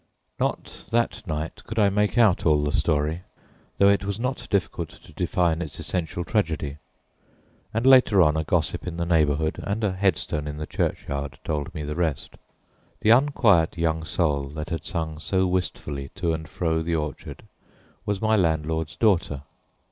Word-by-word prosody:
Not - - -3
that 120 +1 0
night 80 0 -4
could 115 - -6
I 105 -2 +5
make 105 +3 +1
out 110 -6 +4
all 75 -2 +3
the 75 - 0
story, 75 +2 0 0.6
though 100 - +5
it 100 0 +3
was 100 +1 -3
not 130 +2 -3
difficult 90 -5 -1
to - - -17
define 85 -2 0
its 80 -4 -5
essential 90 -1 -3
tragedy, 80 -7 -1 0.9
and 115 +3 -1
later 130 -6 +6
on 75 -1 +3
a 80 - 0
gossip 80 +1 -1
in 85 -1 -4
the 85 - -1
neighborhood 80 -2 +1
and 105 +3 -3
a 105 - +2
headstone 90 -5 0
in 75 0 -5
the 75 - -4
churchyard 70 -1 -3
told 75 -2 -2
me 75 - -4
the 75 +1 -3
rest. 80 -4 -2 0.7
The 110 - +4
unquiet 115 - +4
young 80 -1 0
soul 75 -4 0
that 80 +3 -5
had 80 -3 -3
sung 80 -4 -3
so 95 +4 +1
wistfully 75 -6 -2
to 85 -3 0
and 80 -1 -5
fro 80 -1 0
the 85 +1 -1
orchard 75 -2 -5 0.6
was 105 -2 -2
my 110 0 +4
landlord's 80 -3 0
daughter. 90 -9 +1
85 Hz, 170 wpm, -25 LUFS, 75-100 Hz, 0.9 s, later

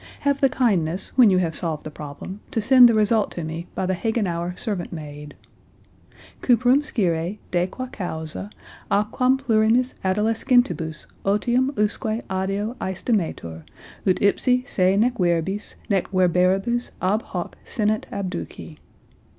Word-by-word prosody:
Have 280 -1 +1
the 270 - +5
kindness 190 -9 0
when 245 -5 +7
you 185 - +3
have 170 -3 0
solved 160 -4 -2
the 155 - -7
problem 150 +7 -8
to - - -1
send 250 +2 +7
the 230 - +2
result 215 0 +2
to 170 - -5
me 165 +2 -5
by - - -1
the 190 - 0
Hagenauer 180 -4 -2
servant 200 -7 -3
maid." 150 -2 -8 1.1
"Cuperem 250 +3 +4
scire, 180 - -1
de 175 0 +1
qua 255 +7 -6
causa, 180 -5 -6 0.4
a 205 +1 +3
quam 260 +1 +2
plurimis 235 0 +2
adolescentibus 195 - +1 0.2
ottium 240 +6 +2
usque 215 +2 -1
adeo 195 +4 -1
aestimetur, 175 - -2 0.5
ut 185 - +3
ipsi 250 +5 +3
se 185 +1 +2
nec 240 +2 +2
verbis, 180 +3 0
nec 195 -3 0
verberibus 185 +6 +2
ab 200 +4 +1
hoc 175 -5 -6
sinant 215 -1 -1
abduci." 185 -5 -6
195 Hz, 135 wpm, -23 LUFS, 175-230 Hz, 1.1 s, when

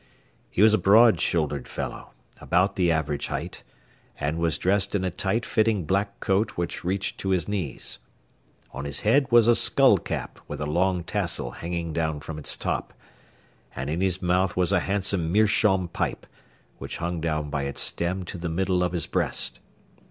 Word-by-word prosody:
He 100 - +2
was 110 0 +6
a 110 - +3
broad 105 0 +6
shouldered 75 -5 0
fellow, - - -6 0.3
about 90 +3 +1
the 90 -3 +2
average 75 -3 -1
height, - - -5 0.6
and 75 +3 -1
was 85 -2 +1
dressed 100 +2 +1
in 95 - 0
a 95 - -1
tight 95 +6 -1
fitting 110 -5 +1
black 100 +3 -1
coat 100 +3 0
which 85 0 -3
reached 95 +3 -2
to 95 - -3
his 95 -2 +1
knees. 95 -10 -4 0.7
On 70 +2 -6
his 70 0 -3
head 130 +6 +3
was 120 -1 +6
a 120 - +6
skull - - +4
cap - - -5
with - - -6
a 75 - -2
long 90 +3 +1
tassel - - -2
hanging 85 -1 -4
down 80 -2 -1
from 75 +1 -7
its 75 - -1
top, - - -3 0.8
and 65 +3 -3
in 85 +3 -2
his 95 -1 0
mouth 90 +1 +1
was 90 -2 +2
a - - +4
handsome 95 -4 0
meerschaum 100 -2 +3
pipe, 85 - -3 0.5
which - - -5
hung 85 -1 -3
down 75 -2 -2
by 70 -1 -1
its 70 - -2
stem 90 +2 -1
to 90 - -7
the 85 0 -3
middle 90 +2 0
of 90 -1 -1
his 85 - -1
breast. - - 0
90 Hz, 180 wpm, -25 LUFS, 80-100 Hz, 0.8 s, was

